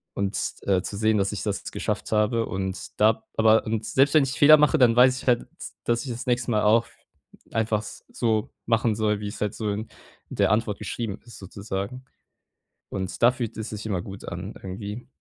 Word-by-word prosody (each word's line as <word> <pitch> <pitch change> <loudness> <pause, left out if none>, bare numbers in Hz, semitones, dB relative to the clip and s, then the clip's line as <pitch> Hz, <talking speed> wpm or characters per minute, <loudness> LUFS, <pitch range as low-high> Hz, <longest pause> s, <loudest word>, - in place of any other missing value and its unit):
und, 100 0 -1 0.3
äh, 95 -2 +2
zu 100 - -6
sehen, 110 +1 +2
dass 100 +1 0
ich 100 - -4
das 100 -2 -3
geschafft - - -3
habe 110 +2 +2
und 95 0 -5
da 110 +1 +3
aber 110 0 +5
und 110 0 -2
selbst 135 +5 +3
wenn 155 - +7
ich 135 -1 -2
Fehler 155 0 +9
mache, 150 +2 +4
dann 120 -3 +5
weiß 130 +1 +5
ich - - -14
halt, 120 -1 +3
d - - -18 0.4
dass 120 +2 0
ich 130 - -4
das 120 +2 -6
nächste 120 0 0
mal 105 -1 +2
auch 115 +2 +4 0.6
einfach 110 -1 0
s 105 - -11
so 110 0 0 0.2
machen 115 -2 +2
soll, 105 -1 0
wie's 105 +1 -6
halt 105 0 0
so 110 -2 -2
in 110 +2 -4 0.4
der - - +1
Antwort 105 -1 0
geschrieben 110 -4 -4
ist 120 - -12
sozusagen. 100 +5 -6 0.8
Und 95 +1 -5
da 120 - +8
fühlt 120 -4 -5
es 110 0 -5
sich 105 0 -6
immer 95 -5 -1
gut 95 +1 -9
an - - -6
irgendwie. 100 +5 -7
110 Hz, 205 wpm, -25 LUFS, 105-120 Hz, 0.8 s, Fehler